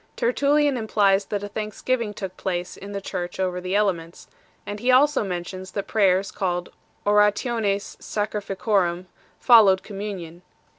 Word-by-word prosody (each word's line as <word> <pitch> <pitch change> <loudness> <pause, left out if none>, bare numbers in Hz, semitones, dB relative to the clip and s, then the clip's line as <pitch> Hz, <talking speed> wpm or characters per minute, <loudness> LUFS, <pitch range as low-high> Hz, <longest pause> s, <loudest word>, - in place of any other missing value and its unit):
Tertullian 285 +3 +2
implies 205 -3 +2
that 205 0 -3
a - - -3
thanks 215 0 -6
giving 235 -4 0
took 190 -3 -7
place 180 -2 -3
in 200 +1 -10
the 200 -1 -4
Church 175 -1 -5
over 180 -1 -1
the 185 +2 -2
elements 180 -5 -1
6; - - -20 0.3
and 205 0 -5
he 245 +4 -1
also 275 +1 +4
mentions 185 0 -5
that 200 - -3
prayers, 195 -2 +2
called 180 -4 -2 0.2
" - - -39
orationes 210 0 +1
sacrifici 205 -2 -3
orum," 185 -4 +1 0.3
followed 205 -6 +6
communion. 195 -5 -7
200 Hz, 155 wpm, -24 LUFS, 185-215 Hz, 0.3 s, followed